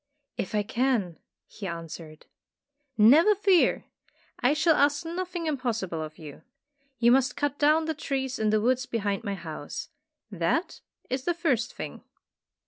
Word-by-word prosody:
"If 195 - -4
I 210 - +2
can," 220 -6 0 0.3
he 200 - -8
answered. 165 -2 -8 0.7
"Never 300 - +6
fear! 385 -3 +3 0.5
I 255 +2 +3
shall 325 +1 +4
ask 290 +2 +2
nothing 350 0 -4
im 305 -3 0
possible 220 -10 -2
of 155 0 -7
you. 150 -3 -11 0.6
You 235 0 +4
must 260 0 +3
cut 290 -1 -1
down 305 +2 +4
the 320 - -1
trees 270 -3 -3
in 215 -1 +1
the 215 0 +3
woods 255 +2 +1
behind 205 -2 -2
my 200 -2 -2
house. 160 -4 -7 0.4
That 195 - -1 0.3
is 260 +1 -2
the 345 - +1
first 265 -9 0
thing." - - -7
250 Hz, 150 wpm, -27 LUFS, 200-300 Hz, 0.7 s, Never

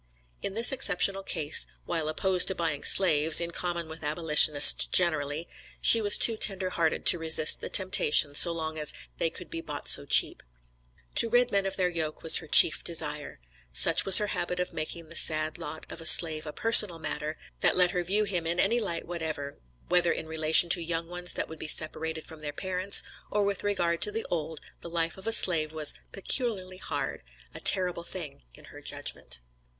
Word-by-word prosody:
In 195 - -7
this 230 +2 +5
exceptional 195 -5 +2
case, 150 - -2 0.2
while 155 -1 -5
opposed 185 +3 +1
to 190 - -3
buying 165 -5 -5
slaves, 160 -4 +4
in 170 0 -5
common 170 -1 -5
with 160 +1 -13
abolitionists 150 -1 +4
generally, 155 -2 -2 0.3
she 230 - +5
was 205 -1 +5
too 225 -2 +3
tender 190 -3 -2
hearted 165 -2 -3
to 175 - +4
resist 160 -1 +1
the - - -8
temptation 155 -6 +2
so 170 +4 +4
long 160 -1 -7
as 150 - -3 0.3
"they 165 - -2
could 170 +1 -10
be 165 - -7
bought 150 -3 -9
so - - +3
cheap." - - +3 0.8
To 230 - +3
rid 245 +1 0
men 200 -1 -2
of 195 - -6
their 185 -2 -1
yoke 160 -3 -7
was 165 - +3
her 160 - -6
chief 155 +2 +5
desire. 150 - -5 0.3
Such - - +3
was 195 - +9
her 210 - +2
habit 180 +1 -5
of 180 -1 -6
making 160 0 -9
the 170 - -12
sad 155 0 +1
lot 160 -1 -10
of - - -12
a 165 - +1
slave 155 -2 +4
a - - -7
personal 210 -1 +5
matter; 155 -1 -6 0.2
that - - +1
let 180 -1 +2
her 180 -1 -4
view 200 +5 -2
him, 180 -5 -4
in 170 +2 -4
any 230 +6 -1
light 170 -7 -6
whatever, 155 -4 -8 0.3
whether 175 -1 0
in - - -6
relation 160 +1 +1
to 175 - 0
young 165 0 -6
ones 180 0 -4
that - - -6
would 160 -1 -13
be - - -8
separated 160 +1 -1
from 160 -1 -15
their 150 -1 -8
parents, 185 +4 +1 0.3
or 210 0 -2
with 200 0 -4
regard 175 -5 -3
to 210 - -2
the 225 +2 -6
old, 160 -2 -6 0.2
the 170 - -12
life 165 0 -4
of 190 +2 -14
a - - -2
slave 165 -8 0
was 155 -2 -1 0.2
"peculiarly 195 -3 -4
hard," 185 - -7 0.3
"a - - -10
terrible 180 -2 +5
thing" 170 -5 -9
in - - -19
her - - -14
judgment. - - -6
170 Hz, 200 wpm, -25 LUFS, 155-185 Hz, 0.8 s, was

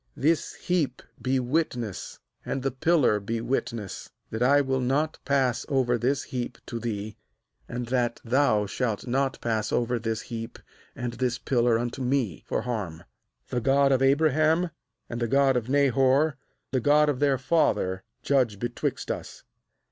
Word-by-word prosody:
^This 155 +3 +1
heap 160 -8 -1 0.2
be 130 0 +1
witness, 125 - -2 0.3
and 135 - -3
the 135 - 0
pillar 135 -4 +3
be 115 +3 -3
witness, 115 -4 -3 0.2
that 110 - -4
I 140 +3 +5
will 130 -2 0
not 140 +5 0
pass 130 -4 +1
over 130 -3 +2
this 130 +4 0
heap 125 -4 -4
to 120 - -5
thee, 110 -2 -4 0.5
and 125 0 -3
that 120 -2 0
thou 115 -4 +3
shalt 110 0 -2
not 135 +2 0
pass 110 -2 -1
over 120 0 +1
this 110 0 -2
heap 115 -1 -6 0.4
and 120 -1 -4
this 125 0 -1
pillar 120 -3 +2
unto 120 +2 -3
me, 125 - 0
for - - -1
harm. 105 -10 -4 0.5
^The 125 - 0
God 135 +3 +4
of 130 -1 +3
Abraham, 155 +5 +3 0.4
and 120 0 -5
the 120 - +1
God 135 +2 +3
of 120 0 -1
Nahor, 140 +2 +3 0.4
the 130 - +1
God 150 +3 +5
of 145 -4 0
their 140 -2 +3
father, 105 - +1 0.2
judge 125 -7 +2
be 120 +4 -2
twixt 120 - -3
us.' - - -7
125 Hz, 160 wpm, -27 LUFS, 115-140 Hz, 0.5 s, I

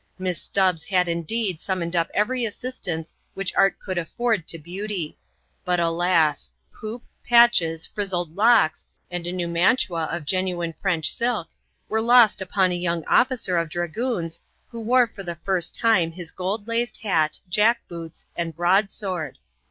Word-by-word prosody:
Miss 185 -2 -2
Stubbs 185 -5 +1
had 180 -1 +2
indeed 170 +2 -1
summoned 180 -3 -2
up 170 -1 +1
every 245 +4 +1
assistance 205 -8 -4 0.2
which 195 -1 -1
art 195 0 +3
could 185 -2 -3
afford 215 +1 -1
to 165 - -4
beauty; 180 +1 -5 0.5
but, 180 -2 +1
alas! 165 - +1 0.2
hoop, 220 +3 -8 0.2
patches, 235 -10 +4
frizzled 175 -5 -3
locks, 220 -6 +3 0.2
and 175 -1 -4
a - - -2
new 180 -1 -2
mantua 170 -1 +2
of 160 -1 -4
genuine 180 -1 -1
French 170 -3 +2
silk, 235 -8 -1 0.4
were 220 0 +1
lost 235 -3 +5
upon 190 0 +1
a - - -1
young 170 -2 -2
officer 245 -8 +2
of 165 -1 0
dragoons 175 +1 -3 0.3
who 230 -1 -7
wore 245 +2 +4
for 220 -3 -11
the 175 -3 -5
first 185 -3 +1
time 190 -8 +3
his 175 -1 -7
gold 200 +4 -3
laced 230 0 -1
hat, 160 -7 +1
jack 220 +6 +2
boots, 165 -1 -9
and 165 -2 -3
broadsword. 185 - 0
180 Hz, 150 wpm, -23 LUFS, 170-215 Hz, 0.5 s, lost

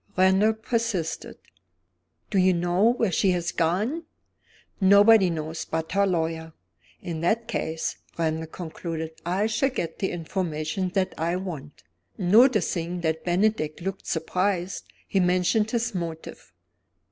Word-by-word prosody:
Randal 190 +4 +4
persisted. 220 -7 -2 0.9
"Do 195 - +3
you 185 0 +5
know 175 +7 +3
where 225 -5 0
she 190 +3 +2
has 175 -1 -1
gone?" 210 - 0 0.7
"Nobody 200 0 +6
knows 160 0 -4
but 160 0 -3
her 200 0 +3
lawyer." 160 -2 -2 0.5
"In 165 -2 -4
that 220 +7 +1
case," 160 -8 -3 0.2
Randal 160 -1 -1
concluded, 160 -1 -5 0.2
"I 190 +4 +1
shall 225 +5 +1
get 210 -11 -4
the 190 - 0
information 170 0 -2
that 190 -1 +1
I 170 +2 0
want." 160 -7 -7 0.3
Noticing 180 -4 +3
that 160 -1 -1
Bennydeck 180 -4 +1
looked 195 +2 -5
surprised, 180 +2 -1 0.2
he 195 - +1
mentioned 180 +4 +2
his 235 0 -1
motive. 165 -3 -6
180 Hz, 125 wpm, -25 LUFS, 165-205 Hz, 0.9 s, Nobody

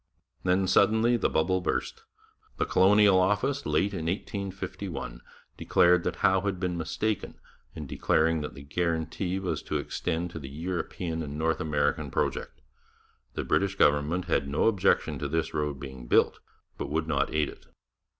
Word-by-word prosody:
Then 95 +1 +2
suddenly 110 +5 +4
the 120 - +1
bubble 95 +4 +1
burst. 450 - -2 0.6
The - - +1
Colonial 100 0 +5
Office, 105 +9 +1
late 100 +1 +1
in 80 -4 -3
1851, 95 - -5 0.4
declared 90 0 +4
that - - -1
Howe 95 0 +4
had 95 -2 -2
been 90 -1 -1
mistaken 90 +5 -3 0.4
in 75 - -6
declaring 80 +3 +1
that 75 - -6
the 70 - -10
guarantee 85 +4 -2
was 95 -2 -2
to - - -2
extend 85 +2 -3
to 80 - -6
the 70 -3 -8
European 85 +1 -4
and 75 -1 -5
North 80 +1 0
American 75 -2 0
project. - - -2 0.7
The - - -2
British 95 +5 +1
government 75 +3 +2
had 80 -5 0
no 70 +2 0
objection 100 -4 +2
to 75 - -2
this 80 +3 -1
road 75 -2 -2
being 65 -3 -9
built, - - +3 0.4
but - - -3
would 80 +2 -1
not 70 -3 0
aid 75 -1 +1
it. - - -14
85 Hz, 160 wpm, -28 LUFS, 75-95 Hz, 0.7 s, Colonial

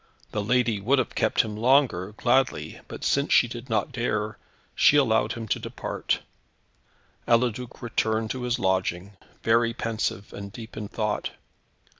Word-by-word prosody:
The 105 - -2
lady 120 -2 +2
would 130 +8 +3
have 130 - 0
kept - - +2
him 110 -2 -5
longer 115 -5 +3
gladly, 125 +4 +1
but - - -8
since 140 +1 +1
she 120 - +6
did 120 +2 -8
not 110 +6 0
dare, 110 -4 -2 0.3
she 145 - +5
allowed 110 -5 +3
him 115 -1 -6
to - - +1
depart. - - -3 1.1
Eliduc 120 +1 +1
returned 110 -1 0
to 130 - -4
his 125 0 0
lodging, 95 0 -1 0.3
very 115 +1 +3
pensive 110 -4 -3
and 100 0 -7
deep 115 +1 -10
in 105 -1 -5
thought. 105 0 -2
115 Hz, 150 wpm, -26 LUFS, 105-125 Hz, 1.1 s, she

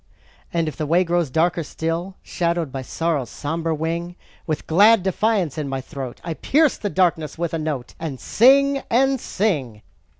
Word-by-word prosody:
And 165 -2 0
if 155 - -4
the 155 - -2
way 170 +4 +4
grows 175 -3 0
darker 170 +5 +1
still, 165 +4 -3
Shadowed 170 -4 -1
by 135 0 -4
Sorrow's 145 -2 -2
somber 165 +5 -3
wing, 165 +3 -3 0.3
With 155 -2 -2
glad 205 +5 +5
defiance 190 -5 0
in 145 -2 -3
my 135 0 -2
throat, 130 -2 -7
I 165 - -3
pierce 300 - +2
the 205 - -3
darkness 165 -6 0
with 170 -1 -2
a 165 - -1
note, 150 -5 -4
And 150 -6 -5
sing, 275 +3 +4
and 265 +3 +3
sing. 140 - -2
165 Hz, 170 wpm, -22 LUFS, 155-190 Hz, 0.3 s, glad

